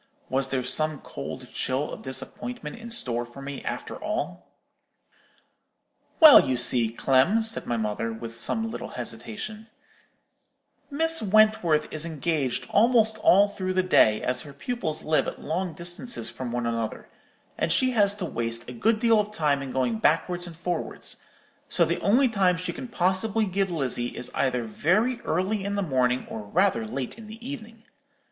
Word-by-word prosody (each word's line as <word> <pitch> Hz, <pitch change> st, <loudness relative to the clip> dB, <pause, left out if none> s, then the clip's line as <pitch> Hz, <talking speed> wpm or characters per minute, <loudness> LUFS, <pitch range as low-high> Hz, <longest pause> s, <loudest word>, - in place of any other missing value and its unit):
Was 135 Hz, 0 st, +1 dB
there 130 Hz, -1 st, -1 dB
some 155 Hz, +3 st, 0 dB
cold 70 Hz, -, -8 dB
chill 130 Hz, +3 st, -1 dB
of -, -, -8 dB
disappointment 135 Hz, -, -5 dB
in 235 Hz, 0 st, -10 dB
store 120 Hz, -, +1 dB
for 120 Hz, +3 st, -12 dB
me, 140 Hz, 0 st, -7 dB
after -, -, -5 dB
all? -, -, -4 dB, 1.7 s
"'Well, 315 Hz, -4 st, +10 dB
you 130 Hz, -2 st, 0 dB
see, 120 Hz, -2 st, +3 dB
Clem,' 135 Hz, -, +2 dB
said 225 Hz, 0 st, -2 dB
my 120 Hz, -, 0 dB
mother, 110 Hz, +1 st, -2 dB
with 115 Hz, 0 st, -7 dB
some 225 Hz, -, -2 dB
little -, -, -6 dB
hesitation, 120 Hz, -, -5 dB, 1.2 s
'Miss 325 Hz, +3 st, +1 dB
Wentworth 210 Hz, -7 st, +3 dB
is 155 Hz, 0 st, -1 dB
engaged 155 Hz, -5 st, -1 dB
almost 220 Hz, -1 st, +3 dB
all 200 Hz, 0 st, +5 dB
through 185 Hz, -2 st, -3 dB
the 185 Hz, -, +3 dB
day, 110 Hz, -12 st, +4 dB
as 125 Hz, 0 st, -1 dB
her 145 Hz, -, -11 dB
pupils 160 Hz, -, -4 dB
live 155 Hz, 0 st, +1 dB
at -, -, -5 dB
long 175 Hz, +1 st, -3 dB
distances 175 Hz, +9 st, -2 dB
from 125 Hz, -2 st, -6 dB
one 120 Hz, 0 st, -2 dB
another, 115 Hz, -1 st, -3 dB, 0.5 s
and -, -, -1 dB
she 255 Hz, +8 st, +3 dB
has 205 Hz, -4 st, +4 dB
to 200 Hz, -3 st, -4 dB
waste 115 Hz, -5 st, -2 dB
a 125 Hz, -, -7 dB
good 215 Hz, -, +1 dB
deal 230 Hz, -2 st, +4 dB
of 210 Hz, 0 st, -1 dB
time 150 Hz, -8 st, +1 dB
in 135 Hz, -, -6 dB
going 125 Hz, -4 st, -1 dB
backwards 175 Hz, +6 st, +1 dB
and 170 Hz, -, -9 dB
forwards; 175 Hz, +1 st, -3 dB, 0.5 s
so 170 Hz, -, +4 dB
the 170 Hz, +2 st, -2 dB
only 250 Hz, +7 st, +4 dB
time 190 Hz, -6 st, +2 dB
she 180 Hz, -, -4 dB
can 260 Hz, -, -7 dB
possibly 205 Hz, +2 st, +1 dB
give 195 Hz, 0 st, -1 dB
Lizzie 130 Hz, -7 st, -2 dB
is 125 Hz, -, -4 dB
either 125 Hz, -2 st, 0 dB
very 210 Hz, -, +1 dB
early 190 Hz, +5 st, 0 dB
in 200 Hz, +1 st, -2 dB
the 200 Hz, -, 0 dB
morning 130 Hz, -5 st, +1 dB
or -, -, -6 dB
rather 110 Hz, +2 st, +1 dB
late 135 Hz, -, -5 dB
in 220 Hz, -, -11 dB
the 225 Hz, +3 st, -10 dB
evening. 230 Hz, -5 st, -8 dB
170 Hz, 170 wpm, -26 LUFS, -, 1.7 s, Well